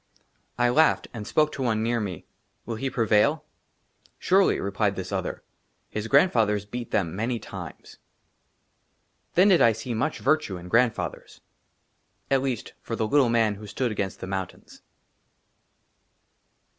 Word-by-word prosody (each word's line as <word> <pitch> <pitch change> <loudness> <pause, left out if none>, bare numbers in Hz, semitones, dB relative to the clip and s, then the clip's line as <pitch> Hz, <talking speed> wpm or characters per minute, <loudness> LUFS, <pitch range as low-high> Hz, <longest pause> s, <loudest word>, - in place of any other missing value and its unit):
I 120 0 +3
LAUGHED, 155 +6 +3
AND 110 -3 -7
SPOKE 155 0 +2
TO 140 - -6
ONE 110 -4 0
NEAR 120 +1 0
ME, 95 -7 -5 0.2
" - - -46
WILL 115 -2 -4
HE 135 +4 -2
PREVAIL? 120 +7 +2 0.2
" - - -46
" - - -34
SURELY," 190 +1 +4
REPLIED 100 0 -1
THIS 95 -1 -6
OTHER; - - -3 0.2
*' - - -45
HIS 105 +1 -3
GRANDFATHERS 115 - +3
BEAT 120 +3 -6
THEM 85 -3 -1
MANY 115 +4 -1
TIMES." - - -10 1.4
THEN 185 +4 +6
DID 180 -4 +5
I 115 - +6
SEE 115 +3 -5
MUCH 125 +8 -1
VIRTUE 155 -12 0
IN 90 +1 -10
GRAND 115 +3 +3
FATHERS, - - -7 0.9
AT 135 -1 +3
LEAST, 130 -4 -3
FOR 115 - -4
THE 110 -1 -1
LITTLE 135 0 +3
MAN 115 -2 +2
WHO 105 +1 -10
STOOD 120 +4 -2
AGAINST 100 -2 -4
THE - - -4
MOUNTAINS. 95 -1 -6
115 Hz, 160 wpm, -26 LUFS, 105-130 Hz, 1.4 s, THEN